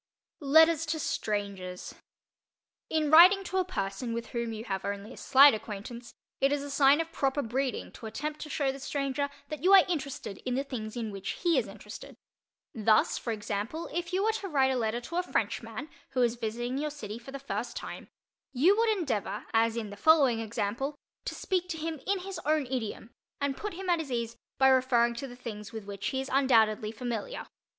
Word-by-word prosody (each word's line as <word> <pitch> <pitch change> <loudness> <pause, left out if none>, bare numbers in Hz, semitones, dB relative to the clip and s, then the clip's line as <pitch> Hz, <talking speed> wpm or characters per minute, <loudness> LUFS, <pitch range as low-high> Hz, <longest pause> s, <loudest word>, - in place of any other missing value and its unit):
LETTERS 320 +2 +5
TO 315 +1 -1
STRANGERS 200 -8 -3 1.0
In 310 -2 +1
writing 365 +5 +8
to 375 0 -3
a 375 - +3
person 230 - -3
with 235 0 -5
whom 235 -1 -3
you 220 0 -5
have 195 -4 -3
only 200 +4 -4
a - - -13
slight 275 +1 +7
acquaintance, 220 +3 -7 0.2
it 275 +1 +3
is 290 -1 0
a 285 - -6
sign 280 +1 +5
of 330 0 -2
proper 275 -1 0
breeding 255 +3 -2
to 225 - -9
attempt 300 +7 -4
to 305 - -7
show 280 -2 0
the 270 - -9
stranger 280 +1 -2 0.2
that 300 -2 -6
you 380 +2 +5
are 385 -2 +9
interested 280 - -4
in 250 -1 -3
the 270 - 0
things 235 -5 -6
in 225 -3 -3
which 195 -1 -5
he 340 -2 +4
is - - +1
interested. - - -10 0.6
Thus, 220 -1 +3
for 235 - -3
example, 215 +8 -4
if 345 +1 -3
you 375 +2 +1
were 440 - +3
to 425 -3 -4
write 270 -6 +3
a - - 0
letter 235 0 -1
to 340 +8 -5
a - - +3
Frenchman 350 -3 -2 0.3
who 255 - +1
was 240 -2 +3
visiting 240 +3 -3
your 300 +1 -1
city 230 -7 -7
for 240 +3 -11
the 275 - -5
first 275 0 -4
time, - - -7 0.5
you 320 +10 +5
would 455 +1 +2
endeavor, 275 - -2
as 225 0 +3
in 215 -3 -4
the - - -7
following 270 0 +5
example, 225 +6 -2 0.3
to - - -3
speak 365 -2 -1
to 320 - -3
him 320 -1 -4
in 395 -1 +1
his 390 0 -6
own 305 -1 +2
idiom 240 -3 -4 0.3
and 280 -1 0
put 420 +2 -5
him 380 +1 -6
at 345 -2 +3
his 300 -5 -5
ease 235 -1 -2 0.2
by 265 - +5
referring 255 -2 +4
to 235 +4 -5
the 245 - -10
things 215 -4 -7
with 220 -3 -7
which 200 -1 -5
he 265 - -1
is 265 +1 -4
undoubtedly 220 -6 +3
familiar. 245 - -4
265 Hz, 205 wpm, -29 LUFS, 225-310 Hz, 1.0 s, are